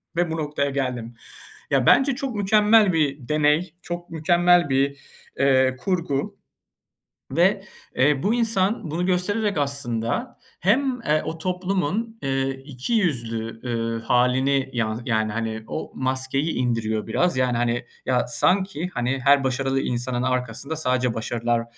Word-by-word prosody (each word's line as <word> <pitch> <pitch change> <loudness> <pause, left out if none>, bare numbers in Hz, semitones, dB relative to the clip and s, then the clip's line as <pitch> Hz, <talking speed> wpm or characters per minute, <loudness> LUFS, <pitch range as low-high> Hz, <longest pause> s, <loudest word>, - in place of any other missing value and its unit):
ve 175 -1 0
bu 165 - -2
noktaya 145 -2 -1
geldim. 125 -4 -3 0.6
Ya, - - +3
bence 270 -1 +5
çok 265 -3 -4
mükemmel 210 0 +4
bir 140 -5 0
deney, 150 +3 +2
çok 175 0 -6
mükemmel 175 +1 +3
bir, 135 +1 +1 0.4
ııı, 130 -1 +3
kurgu 165 -3 -2 0.9
ve, - - +2 0.3
eee, 140 +2 +2
bu 205 +4 +2
insan 220 -6 0
bunu 175 +3 -1
göstererek 200 +3 0
aslında 140 - -2 0.2
hem, 250 +5 +1
eee, 155 -7 +1
o 160 +1 -4
toplumun, 185 +5 -2
ııı, 135 0 0
iki 135 - -6
yüzlü, 115 - -1
ııı, 115 -1 -2
hâlini 130 +3 +2
yan 110 -1 -1
yani, 110 -2 0
hani, 110 0 -3
o 155 - -5
maskeyi 130 +4 -1
indiriyor 115 -3 -1
biraz. 175 +6 +1
Yani, 125 -2 +1
hani, 120 0 0 0.2
ya, 125 -1 +1
sanki, 180 +2 +1
hani, 125 +1 -1
her 140 0 +5
başarılı 135 +1 0
insanın 125 0 -2
arkasında 125 +3 -2
sadece 125 -5 0
başarılar 115 +1 -1
140 Hz, 135 wpm, -23 LUFS, 125-175 Hz, 0.9 s, bence